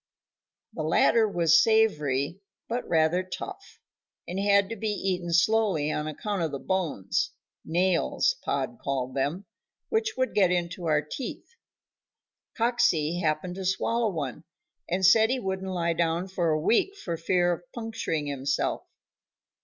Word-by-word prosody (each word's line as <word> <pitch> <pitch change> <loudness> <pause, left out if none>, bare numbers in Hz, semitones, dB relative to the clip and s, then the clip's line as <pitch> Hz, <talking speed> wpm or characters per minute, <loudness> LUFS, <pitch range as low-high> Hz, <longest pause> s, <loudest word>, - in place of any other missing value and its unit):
The - - -4
latter 225 -2 +3
was 165 -3 +4
savory, 165 -9 +2 0.3
but 240 +2 -3
rather 160 +2 +3
tough, 380 - -8 0.5
and 180 +2 -3
had 200 0 +4
to 230 - -4
be 220 +1 -4
eaten 185 -4 -2
slowly 180 -4 +2
on 150 0 -2
account 195 +5 -3
of 165 - 0
the 140 - -4
bones 145 - -1 0.3
nails, 180 - +1
Pod 235 - -2
called 130 -2 -2
them 145 +9 -2 0.4
which 445 0 0
would 260 0 0
get 190 -3 +4
into 175 -1 -2
our 150 -1 +2
teeth. 240 - -7 1.1
Coxey 200 -9 +2
happened 160 +1 -1
to 190 - -4
swallow 225 +5 +1
one, 155 -4 -4 0.5
and 185 +2 +1
said 220 +4 +6
he 260 +1 0
wouldn't 190 -2 -3
lie 170 -2 0
down 170 +2 0
for 180 -3 -1
a 155 0 +2
week 235 - +2
for 170 - -4
fear 175 +1 +1
of 170 - -6
puncturing 225 -10 -3
himself. 140 -1 -1
180 Hz, 145 wpm, -27 LUFS, 155-210 Hz, 1.1 s, said